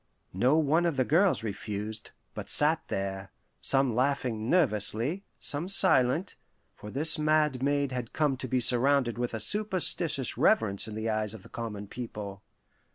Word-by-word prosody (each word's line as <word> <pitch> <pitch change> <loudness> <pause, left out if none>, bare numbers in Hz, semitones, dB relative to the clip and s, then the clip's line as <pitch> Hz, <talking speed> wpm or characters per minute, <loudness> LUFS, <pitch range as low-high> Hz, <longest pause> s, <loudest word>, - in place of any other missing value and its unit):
No 125 - +3
one 160 +3 +2
of 160 -5 -2
the 130 - +2
girls 175 - +2
refused, 105 0 -5 0.2
but - - -7
sat 155 +2 +4
there, 95 0 -4 0.3
some 135 -3 +3
laughing 125 -3 -1
nervously, 140 - +1
some 150 +5 -2
silent; 175 -3 +2 0.4
for 105 - -11
this 155 +7 0
mad 150 -4 +1
maid 140 0 0
had 125 -3 -5
come 150 -3 +1
to 130 - -6
be 130 +1 0
surrounded 125 0 +2
with 120 -1 -2
a - - -4
superstitious 175 - +1
reverence 100 -1 +2
in 110 - -7
the 110 +1 -3
eyes 110 -1 -1
of 100 - -12
the - - -15
common 105 -3 -6
people. 105 -3 -7
125 Hz, 160 wpm, -28 LUFS, 110-150 Hz, 0.4 s, sat